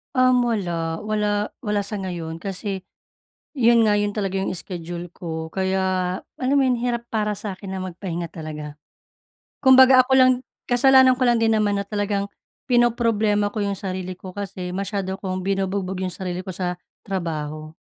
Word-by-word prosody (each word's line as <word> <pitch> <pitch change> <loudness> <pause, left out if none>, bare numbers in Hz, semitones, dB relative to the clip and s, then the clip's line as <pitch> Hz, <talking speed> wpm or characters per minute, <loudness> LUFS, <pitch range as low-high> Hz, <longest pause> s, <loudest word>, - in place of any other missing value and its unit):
Um, 255 -1 +4
wala. 170 -7 -2
Wala, 210 -1 0 0.2
wala 210 -1 +1
sa 205 +1 -4
ngayon 170 -4 -5
kasi 195 +1 -5 0.7
'yon 235 -2 +5
nga 205 - +3
'yon 205 0 0
talaga 195 -2 -2
yung 190 0 -1
schedule 175 -1 -6
ko, 160 -2 -6
kaya 190 +2 0 0.6
alam 260 +1 0
mo 280 - +5
'yon 255 -2 +2
hirap 240 0 -1
para 210 -1 0
sa'kin 195 -1 -6
na 190 - -3
magpahinga 175 -2 -5
talaga. 150 -2 -7 0.9
Kumbaga 260 -1 +8
ako 265 - -3
lang 260 -1 +7 0.4
kasalanan 260 +1 +6
ko 255 - +1
lang 240 -2 +3
din 225 -1 +3
naman 205 -2 +1
na 200 - -6
talagang 205 -1 -1 0.4
pinoproblema 230 -4 +2
ko 205 0 -3
yung 200 -1 -2
sarili 185 -1 -4
ko 185 +1 -10
kasi 190 -2 -5
masyado 190 +1 -3
kong 185 -1 -4
binubugbog 195 0 -1
yung 185 - -3
sarili 180 0 -4
ko 185 - -5
sa 180 0 -2 0.2
trabaho. 155 -5 -4
200 Hz, 160 wpm, -23 LUFS, 180-225 Hz, 0.9 s, Kumbaga